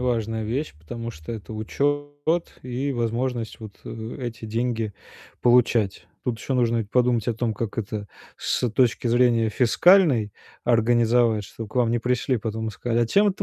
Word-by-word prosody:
важная 115 Hz, -3 st, -1 dB
вещь, 125 Hz, -, -3 dB
потому 115 Hz, +9 st, -6 dB
что 80 Hz, -2 st, -10 dB
это 110 Hz, 0 st, -7 dB
учет 145 Hz, +8 st, -1 dB
и 130 Hz, +3 st, -2 dB
возможность 120 Hz, -1 st, -2 dB
вот, 110 Hz, -2 st, -8 dB
э, 110 Hz, 0 st, -6 dB
эти 115 Hz, -3 st, -5 dB
деньги 115 Hz, -1 st, -1 dB, 0.5 s
получать. 115 Hz, -7 st, +3 dB, 0.2 s
Тут 120 Hz, -2 st, -1 dB
еще 135 Hz, -, -4 dB
нужно 120 Hz, -2 st, +2 dB
ведь 105 Hz, -2 st, -4 dB
подумать 125 Hz, -3 st, +2 dB
о 115 Hz, -, +1 dB
том, 110 Hz, -1 st, -1 dB
как 115 Hz, +1 st, -4 dB
это 105 Hz, -1 st, -3 dB, 0.3 s
с 125 Hz, -, 0 dB
точки 120 Hz, +1 st, +2 dB
зрения 120 Hz, -1 st, +3 dB
фискальной 130 Hz, -, +4 dB, 0.3 s
организовать, 115 Hz, -2 st, +3 dB
чтоб 110 Hz, +2 st, -8 dB
к -, -, -15 dB
вам 120 Hz, -2 st, +3 dB
не 120 Hz, -, +1 dB
пришли 125 Hz, +2 st, 0 dB
потом 110 Hz, 0 st, -3 dB
и -, -, -3 dB
сказали: 115 Hz, +3 st, -1 dB
"А -, -, +1 dB
чем 200 Hz, -, +4 dB
это 195 Hz, 0 st, -2 dB
115 Hz, 170 wpm, -24 LUFS, 110-125 Hz, 0.5 s, фискальной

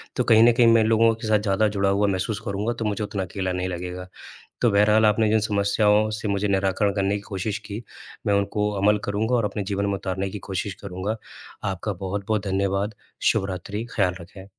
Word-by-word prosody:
तो -, -, +1 dB
कहीं 110 Hz, -1 st, +6 dB
न -, -, +7 dB
कहीं 120 Hz, 0 st, +4 dB
मैं 115 Hz, -1 st, +5 dB
लोगों 115 Hz, +1 st, +4 dB
के 115 Hz, 0 st, -6 dB
साथ 110 Hz, -1 st, +3 dB
ज़्यादा 105 Hz, +1 st, +1 dB
जुड़ा 100 Hz, -1 st, 0 dB
हुआ 100 Hz, +1 st, +2 dB
महसूस 100 Hz, +2 st, -1 dB
करूँगा 105 Hz, +3 st, -1 dB
तो 115 Hz, -, -2 dB
मुझे 105 Hz, 0 st, -1 dB
उतना 100 Hz, -2 st, -3 dB
अकेला 95 Hz, +1 st, -3 dB
नहीं 90 Hz, 0 st, -2 dB
लगेगा। 90 Hz, 0 st, -5 dB, 0.5 s
तो 120 Hz, -, +4 dB
बहरहाल 105 Hz, +2 st, +4 dB
आपने 110 Hz, +1 st, +3 dB
जिन 110 Hz, +1 st, +3 dB
समस्याओं 105 Hz, +1 st, +2 dB
से 105 Hz, -, -4 dB
मुझे 100 Hz, +1 st, 0 dB
निराकरण 100 Hz, +1 st, +1 dB
करने 100 Hz, 0 st, 0 dB
की 105 Hz, -, -4 dB
कोशिश 100 Hz, +1 st, -3 dB
की, 105 Hz, +3 st, -6 dB, 0.4 s
मैं 100 Hz, -, +3 dB
उनको 100 Hz, +1 st, 0 dB
अमल 105 Hz, +1 st, +4 dB
करूँगा 110 Hz, +4 st, 0 dB
और 115 Hz, -3 st, +1 dB
अपने 105 Hz, 0 st, -3 dB
जीवन 100 Hz, 0 st, -2 dB
में 100 Hz, -, 0 dB
उतारने 95 Hz, 0 st, -3 dB
की 105 Hz, -, -6 dB
कोशिश 95 Hz, +1 st, -2 dB
करूँगा। 100 Hz, +3 st, -3 dB, 0.5 s
आपका 95 Hz, +3 st, -3 dB
बहुत-बहुत 100 Hz, +3 st, -3 dB
धन्यवाद। 100 Hz, +2 st, -1 dB, 0.4 s
शुभ-रात्रि, 100 Hz, +3 st, -3 dB
ख्याल 90 Hz, -4 st, +2 dB
रखें। 95 Hz, +2 st, -12 dB
100 Hz, 200 wpm, -24 LUFS, 95-105 Hz, 0.5 s, न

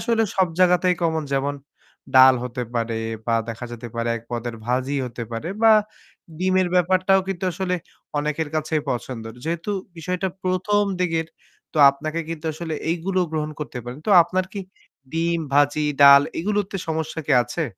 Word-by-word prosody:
আসলে 230 Hz, -2 st, +1 dB
সব 190 Hz, -2 st, +3 dB
জায়গাতেই 180 Hz, 0 st, +4 dB
কমন। 160 Hz, -2 st, 0 dB
যেমন 140 Hz, +1 st, 0 dB, 0.6 s
ডাল 130 Hz, 0 st, +8 dB
হতে 125 Hz, 0 st, -4 dB
পারে 115 Hz, -1 st, -1 dB, 0.3 s
বা 115 Hz, -, +2 dB
দেখা 115 Hz, +2 st, -5 dB
যেতে 120 Hz, 0 st, -7 dB
পারে 115 Hz, 0 st, -2 dB
এক 115 Hz, -, -9 dB
পদের 120 Hz, 0 st, -4 dB
ভাজি 130 Hz, +3 st, 0 dB
হতে 120 Hz, 0 st, -7 dB
পারে 115 Hz, +8 st, -4 dB
বা 225 Hz, -1 st, +8 dB, 0.7 s
ডিমের 185 Hz, 0 st, +2 dB
ব্যাপারটাও 185 Hz, +2 st, +3 dB
কিন্তু 190 Hz, 0 st, -3 dB
আসলে 185 Hz, 0 st, -2 dB, 0.4 s
অনেকের 150 Hz, +1 st, -1 dB
কাছেই 155 Hz, 0 st, -1 dB
পছন্দর। 115 Hz, -2 st, -5 dB
যেহেতু 170 Hz, +5 st, -3 dB, 0.3 s
বিষয়টা 180 Hz, +3 st, -2 dB, 0.2 s
১ম 185 Hz, +3 st, +1 dB, 0.2 s
দিকের, 165 Hz, -2 st, 0 dB, 0.5 s
তো 155 Hz, -, -2 dB
আপনাকে 155 Hz, +4 st, -4 dB
কিন্তু 165 Hz, -1 st, -6 dB
আসলে 160 Hz, +1 st, -5 dB, 0.2 s
এইগুলো 185 Hz, +3 st, -1 dB
গ্রহণ 155 Hz, -1 st, -2 dB
করতে 145 Hz, -4 st, -5 dB
পারেন। 125 Hz, +3 st, -7 dB
তো -, -, +1 dB
আপনার 185 Hz, +2 st, -1 dB
কি 200 Hz, -, -4 dB, 0.5 s
ডিম, 170 Hz, +1 st, 0 dB
ভাজি, 145 Hz, +1 st, +3 dB, 0.2 s
ডাল 140 Hz, 0 st, +9 dB, 0.2 s
এইগুলোতে 200 Hz, +2 st, -1 dB
সমস্যা 160 Hz, 0 st, -2 dB
কি -, -, +3 dB
আছে? 160 Hz, +7 st, -3 dB
160 Hz, 160 wpm, -23 LUFS, 135-180 Hz, 0.7 s, ডাল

